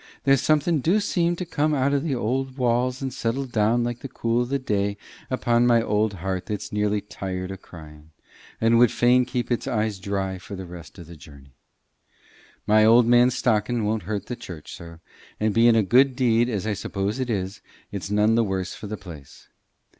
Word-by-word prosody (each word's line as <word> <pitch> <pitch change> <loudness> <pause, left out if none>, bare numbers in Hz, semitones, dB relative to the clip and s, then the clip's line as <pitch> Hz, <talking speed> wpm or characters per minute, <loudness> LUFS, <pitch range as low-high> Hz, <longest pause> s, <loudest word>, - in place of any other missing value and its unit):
There's 135 -2 +4
a - - -8
something 155 +1 +2
do 175 +10 +2
seem 175 -4 0
to 180 - -5
come 150 -2 0
out 140 +1 +1
o' 140 - +2
the 145 -1 -2
old 130 +3 -2
walls 125 +1 0
and 130 -2 -3
settle 125 +4 -2
down 120 0 +1
like 120 0 -3
the - - -7
cool 115 0 -1
o' - - 0
the 140 +3 -1
day 100 -5 -1 0.3
upon 120 -2 +2
my 120 -1 +5
old 105 -1 0
heart 95 0 -4
that's 105 -1 -5
nearly 105 0 0
tired 95 -2 -6
o' 95 - -6
crying, 75 -4 -14 0.5
and 115 +1 +3
would 120 -2 +5
fain 125 +1 +3
keep 125 0 -3
its 120 - -1
eyes 105 -3 -1
dry 95 -1 -3
for 100 +2 -9
the 95 0 -7
rest 85 0 -11
o' 85 - -9
the 85 +1 -12
journey. 70 -3 -16 1.1
My 110 +1 +4
old 115 +2 +6
man's 120 +1 +4
stockin' 110 0 0
won't 110 +1 -1
hurt 105 -2 -3
the 125 - -5
church, 85 -9 -9
sir, 85 0 -12 0.4
and, 110 -1 +1
bein' 115 +1 +5
a 110 - +4
good 130 +6 +4
deed 120 -2 +2
as 105 -4 -3
I 110 - 0
suppose 100 +3 -3
it 130 -1 -2
is, 95 -3 -3 0.3
it's 100 -1 -5
none 105 +2 +3
the 115 0 +3
worse 95 -3 -3
for 105 - -8
the 105 +1 -5
place. 80 -9 -13
110 Hz, 205 wpm, -24 LUFS, 100-125 Hz, 1.1 s, old